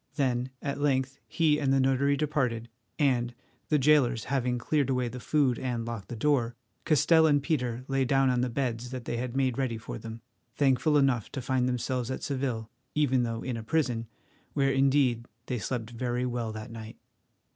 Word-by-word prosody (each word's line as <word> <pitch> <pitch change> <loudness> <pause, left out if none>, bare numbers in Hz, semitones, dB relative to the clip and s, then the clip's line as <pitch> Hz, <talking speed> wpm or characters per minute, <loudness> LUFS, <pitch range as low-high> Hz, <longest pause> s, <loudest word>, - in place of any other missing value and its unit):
Then 130 -3 0
at 140 0 -3
length 135 -1 0
he 155 -2 +2
and 140 -3 +1
the 135 - +4
notary 135 +2 +2
departed, 130 -7 -1 0.3
and, 120 -4 +1 0.3
the 150 - +4
jailers 135 -5 +3
having 125 -2 0
cleared 140 +3 0
away 125 -2 0
the 125 - -7
food 135 -3 +1
and 120 -3 -2
locked 115 -5 -5
the 120 - -6
door, 120 -2 +1 0.3
Castell 160 +1 +5
and 145 -2 +3
Peter 125 -6 -1
lay 135 -1 +1
down 135 0 +3
on 125 -1 +1
the 125 - 0
beds 120 -1 -2
that 130 -2 -6
they 120 - -2
had 125 +1 -3
made 130 -1 +1
ready 125 -4 -1
for 110 - -7
them, 115 0 -8 0.3
thankful 145 +2 +3
enough 135 -6 +2
to 135 - -3
find 125 0 0
themselves 125 0 -2
at 130 - -4
Seville, 130 -5 -2 0.3
even 135 -4 +3
though 115 -1 -2
in 125 -2 -3
a - - -5
prison, 120 -2 0 0.5
where 135 -1 +2
indeed 135 -3 +2 0.2
they 125 -1 -2
slept 115 0 -3
very 120 +1 -2
well 120 -2 -2
that 110 +1 -7
night. 110 -1 -9
130 Hz, 190 wpm, -28 LUFS, 120-140 Hz, 0.5 s, Castell